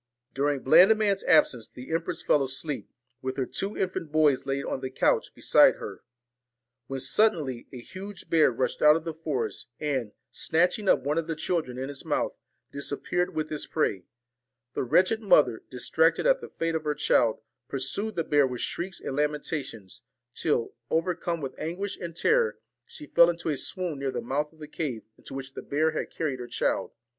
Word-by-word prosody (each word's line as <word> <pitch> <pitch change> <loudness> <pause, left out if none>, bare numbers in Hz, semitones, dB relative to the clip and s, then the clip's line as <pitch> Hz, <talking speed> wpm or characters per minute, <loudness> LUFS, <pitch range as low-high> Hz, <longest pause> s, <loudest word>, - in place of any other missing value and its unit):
During 140 0 0
Blandiman's 200 +6 +5
absence 130 -8 +4
the 125 +5 -10
empress 165 +1 -2
fell 145 - +3
asleep, 135 +2 -4 0.3
with 130 +1 -4
her 130 - 0
two 195 +10 -2
infant 180 -5 -2
boys 150 -4 +3
laid 135 0 -1
on - - -2
the 130 - -3
couch 130 - +1
beside - - +5
her, - - -8 0.9
when 135 0 -4
suddenly 145 - +1
a 130 - -8
huge 190 +9 -9
bear 160 -2 +5
rushed 125 +2 -2
out 150 0 +7
of 165 - -2
the 165 -1 -4
forest, 155 -6 -3
and, 135 -8 -1 0.2
snatching 180 +5 +1
up - - +4
one 150 +4 +1
of 165 - -4
the 165 - -2
children 155 -6 -2
in 130 +1 -3
its 140 -1 -6
mouth, - - -1 0.4
disappeared 160 +5 -2
with 155 0 -2
its 150 - -3
prey. 100 - -1 0.7
The - - -1
wretched 185 - +3
mother, 150 - +4
distracted 160 - +2
at - - +4
the - - -8
fate 165 0 -2
of 160 -1 -1
her 150 -1 -1
child, 120 -5 +2 0.3
pursued 170 +11 -3
the 165 - 0
bear 145 -3 +3
with 125 -2 -5
shrieks 190 +2 -3
and 135 - -5
lamenta 150 +1 0
tions, 105 -7 -10 0.3
till, 135 -7 0 0.2
overcome 170 0 -1
with 135 - -4
anguish 185 +5 -3
and 170 -2 -7
terror, 475 - +2 0.3
she 300 - -10
fell 170 - +6
into 170 -1 -2
a 150 - +1
swoon 170 +1 -2
near 135 0 -1
the - - -3
mouth 150 +3 -2
of 160 - -23
the 155 -1 -9
cave 140 -7 -4 0.2
into - - -10
which 135 0 -6
the - - -6
bear 155 +3 +1
had 155 - -3
carried 145 -6 -3
her 120 - -6
child. 120 - -1
150 Hz, 190 wpm, -27 LUFS, 135-170 Hz, 0.9 s, out